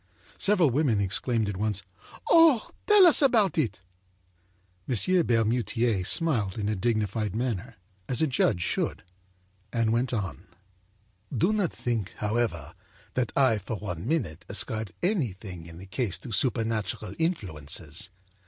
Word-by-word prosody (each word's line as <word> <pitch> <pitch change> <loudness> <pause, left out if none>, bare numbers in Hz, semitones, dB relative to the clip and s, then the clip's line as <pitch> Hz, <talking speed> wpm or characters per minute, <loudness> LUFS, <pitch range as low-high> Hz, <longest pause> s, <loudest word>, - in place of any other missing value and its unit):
â - - -24
Several 185 -8 +3
women 130 -5 +2
exclaimed 110 +3 0
at 100 -2 -3
once: 105 -2 -1 0.5
âOh! 325 -8 +5 0.2
Tell 420 -3 +8
us 335 - +6
about 225 - +4
it!â 95 - -4
M. 170 - +1
Bermutier 115 -2 +1
smiled 115 - 0
in 105 -2 -2
a 105 - 0
dignified 105 -1 -1
manner, 120 0 -3 0.3
as 125 - +1
a 160 - +4
judge 110 - +1
should, - - -2 0.7
and 115 -2 +1
went 120 +2 0
on: 95 - -4 0.8
âDo 145 - +1
not 200 -6 0
think, 115 -6 -3
however, 105 -8 -1 0.4
that 125 -3 -1
I, 130 -6 +3
for 105 +3 -5
one 95 -2 -5
minute, 115 - -1
ascribed 110 0 0
anything 100 - -2
in 85 0 -11
the 95 - -10
case 100 -2 -1
to 105 +7 -9
supernatural 110 -3 -1
influences. 85 - -3
110 Hz, 135 wpm, -27 LUFS, 95-130 Hz, 0.8 s, Tell